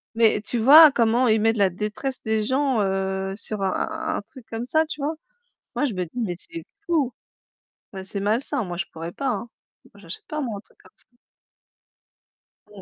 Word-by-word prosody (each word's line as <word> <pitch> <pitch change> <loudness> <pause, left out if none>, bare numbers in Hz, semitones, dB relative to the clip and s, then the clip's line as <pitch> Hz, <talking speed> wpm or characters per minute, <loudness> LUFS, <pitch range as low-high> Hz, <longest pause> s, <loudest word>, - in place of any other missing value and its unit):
Mais 225 -2 +4
tu 240 - -4
vois 295 +6 +9
comment 240 +1 +2
ils 220 -1 +3
mettent 225 0 +2
la 200 -2 +4
détresse 215 +8 -4
des 220 -1 0
gens, 260 0 +1
heu, 190 0 -1
sur 210 0 -4
un 190 - 0 0.3
un - - -3
truc 225 +4 -15
comme 225 +1 -4
ça 315 +5 +2
tu 305 -2 -6
vois? 300 +3 -1 0.6
Moi - - 0
je 255 -7 -1
me 185 -1 -1
dis: 240 +9 -5
«Mais 185 -6 -2
c'est 335 - -8 0.2
fou», 300 -7 +1 0.8
bah, 190 -1 -6
c'est 195 +1 -5
malsain, 235 +6 0
moi 175 -3 -5
je 190 - -2
pourrais 165 +1 -6
pas, 275 +9 -4
hein. 240 -1 -3 0.4
Moi - - -22
j'achète 170 -1 -8
pas 305 0 -3
moi, 230 -7 -3
un - - -7
truc - - -27
comme - - -20
ça. - - -8 1.6
Mmh, 205 -2 -13
225 Hz, 200 wpm, -24 LUFS, 195-265 Hz, 1.6 s, vois